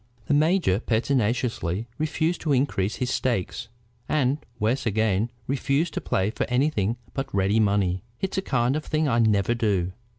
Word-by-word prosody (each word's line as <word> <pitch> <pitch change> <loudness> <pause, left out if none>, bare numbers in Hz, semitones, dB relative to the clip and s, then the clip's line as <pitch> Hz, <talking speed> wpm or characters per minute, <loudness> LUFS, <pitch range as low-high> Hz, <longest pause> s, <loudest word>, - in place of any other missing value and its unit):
The - - 0
major 155 - +3
pertinaciously 115 - 0
refused 160 +2 0
to 150 -3 +1
increase 120 -7 +1
his 125 0 -2
stakes, 115 -3 -1 0.4
and, 140 -1 +1 0.2
worse 120 +4 0
again, 110 0 +1 0.2
refused 140 +5 0
to - - -3
play 95 +3 0
for - - -2
anything 125 -4 +1 0.2
but 135 0 -4
ready 100 +3 +2
money. 100 -4 +2 0.2
"It's 190 0 -1
a - - -1
kind 125 -5 +1
of 155 - -2
thing 155 0 0
I 120 -3 +2
never 110 -1 +3
do. 100 -6 0
120 Hz, 160 wpm, -25 LUFS, 105-140 Hz, 0.4 s, major